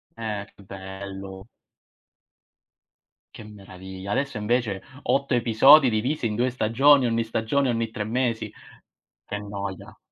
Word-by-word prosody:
Eh, 105 -3 -4
che 100 - -17
bello. 95 0 -9 1.9
Che - - -10
meraviglia. 95 -2 -10
Adesso 135 +2 -1
invece 105 -2 -1 0.2
8 140 -1 0
episodi 125 +4 +6
divisi 120 +4 -1
in 105 - -3
2 125 +2 0
stagioni, 130 +4 +4
ogni 115 0 0
stagione 115 +5 0
ogni 115 -1 -1
3 110 -1 -4
mesi. 115 +1 -2 0.7
Che 105 - -5
noia. 100 -2 -7
110 Hz, 120 wpm, -24 LUFS, 100-125 Hz, 1.9 s, episodi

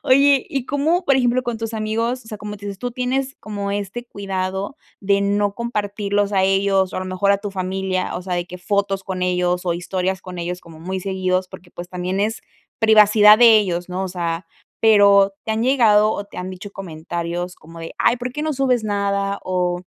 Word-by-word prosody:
Oye, 275 0 +4
¿y 270 -2 -3
cómo?, 315 +6 +1
por 275 - +4
ejemplo, 255 -1 +2
con 240 -2 -3
tus 225 0 -4
amigos, 225 +3 -2
o - - -19
sea, 215 - -7
como 210 0 -6
dices, 200 -1 -7
tú 245 +4 -3
tienes 260 +2 -2
como 205 -2 -4
este 205 +4 -4
cuidado 195 +2 -4 0.2
de 200 0 +2
no 200 0 +1
compartirlos 205 -3 -1
a 190 -1 +3
ellos 195 0 +2
o, - - -4
a - - -1
lo - - -4
mejor, 185 +2 +1
a 200 - +3
tu 205 0 -5
familia, 185 0 -2
o 180 - -6
sea, 180 -1 -3
de 175 0 -2
que 180 +1 -9
fotos 195 +1 -1
con 185 -1 -4
ellos, 180 0 0
o 175 -2 0
historias 185 +1 -2
con 180 -1 -8
ellos, 175 +1 -4
como 160 -1 -14
muy 185 +3 -4
seguidos, 185 -1 -1
porque, 175 -1 -13
pues, 175 0 -8
también 180 +1 -3
es 220 +2 -1 0.4
privacidad 215 -1 +7
de 235 -2 +8
ellos, 180 -3 -2
¿no? 180 +1 -3
O 190 - -3
sea, 170 -1 -3 0.3
pero, 200 -2 +6
¿te 220 - -1
han 220 +1 -1
llegado, 220 -5 +4
o 205 - -4
te 205 - -16
han 180 +1 -4
dicho 190 +2 -9
comentarios 175 0 -5
como 165 0 -14
de: 165 0 -8
"Ay, 240 - +3
¿por 250 0 -5
qué 300 - -4
no 310 0 -1
subes 255 -4 +1
nada?", 200 -1 -1
o 180 -1 -1
200 Hz, 215 wpm, -21 LUFS, 185-220 Hz, 0.4 s, de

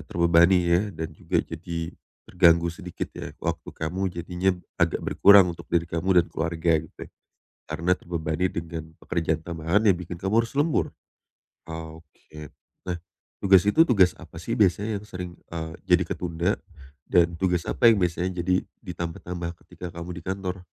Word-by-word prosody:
terbebani 85 +4 +4
ya, 85 +1 +3 0.2
dan 80 0 -3
juga - - -3
jadi 85 0 -5 0.4
terganggu 85 -1 +4
sedikit, 90 0 -6
ya. - - -6
Waktu - - -3
kamu 80 +4 -4
jadinya 90 +2 0 0.3
agak 85 -1 +2
berkurang 100 -3 +6
untuk 85 - -13
diri 85 -1 +3
kamu 90 +2 +3
dan 85 - -2
keluarga, 80 +1 0
gitu, - - -11
ya. - - -14 0.6
Karena 85 +3 -1
terbebani 85 0 -2
dengan 80 -1 -5 0.2
pekerjaan 80 -2 -1
tambahan 85 +4 0
yang 95 - +6
bikin 90 0 -7
kamu 105 +5 +2
harus 115 - -13
lembur. 145 +3 +1 0.8
Oke. 80 -1 -10 0.4
Nah, 90 - -1 0.5
tugas 95 -1 +7
itu, 160 +10 +6
tugas 95 - +4
apa 80 -1 -11
sih - - -3
biasanya 105 +2 +2
yang - - -12
sering, 90 -3 -6 0.2
eee, 80 -1 -4
jadi 90 -1 +4
ketunda? 85 +3 -1 0.5
Dan 85 -1 +3
tugas 90 -1 0
apa 120 -2 +5
yang 105 - +1
biasanya 90 +1 -1
jadi 90 +1 +1 0.2
ditambah-tambah 85 0 -5
ketika 90 -2 -9
kamu 85 +1 -7
di 90 - -8
kantor? 95 -1 -4
85 Hz, 155 wpm, -25 LUFS, 85-95 Hz, 0.8 s, tugas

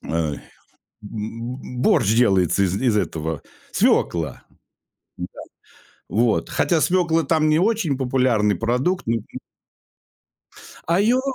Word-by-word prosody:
Эм, 80 -3 -2 0.7
б 115 +4 -6
борщ 125 - +3
делается 100 -5 +3
из 95 +1 0
из 120 -5 +2
этого, 80 -6 -2 0.3
свекла. 85 -2 +1 0.7
Да. - - -4 0.8
Вот, 115 +1 +1
хотя 165 -3 +1
свекла 170 -2 +2
там 155 +1 +2
не 155 +2 +3
очень 195 - +1
популярный 125 -6 +1
продукт. 125 - -1 1.8
А 170 +3 +3
её 240 +5 +3
125 Hz, 100 wpm, -22 LUFS, 100-160 Hz, 1.8 s, борщ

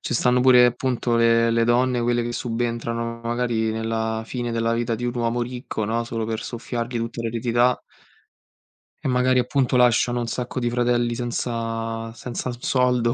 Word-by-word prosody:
Ce - - -4
stanno 125 +1 +3
pure 125 -1 +7
appunto 125 -1 0
le 115 0 +4
le 115 0 +2
donne, 120 +1 +2
quelle 120 0 +1
che 120 0 -3
subentrano 115 -1 -3
magari 115 -1 0
nella 110 0 -2
fine 120 0 -3
della 115 0 0
vita 115 0 -1
di 120 +2 -3
un 120 - -2
uomo 120 0 0
ricco, 120 -2 -4
no, 115 +1 -1
solo 115 -1 -3
per 110 0 -3
soffiargli 120 0 -4
tutta 115 0 -4
l'eredità. 120 +2 +1 1.2
E - - -1
magari, 125 0 +3
appunto, 125 +1 +1
lasciano 120 0 +3
un 120 - -2
sacco 125 +2 -3
di 120 -1 0
fratelli 120 0 +1
senza 115 -1 -3
senza 125 +2 -5
un 120 0 -6
soldo, 125 -2 +2
120 Hz, 170 wpm, -23 LUFS, 115-125 Hz, 1.2 s, pure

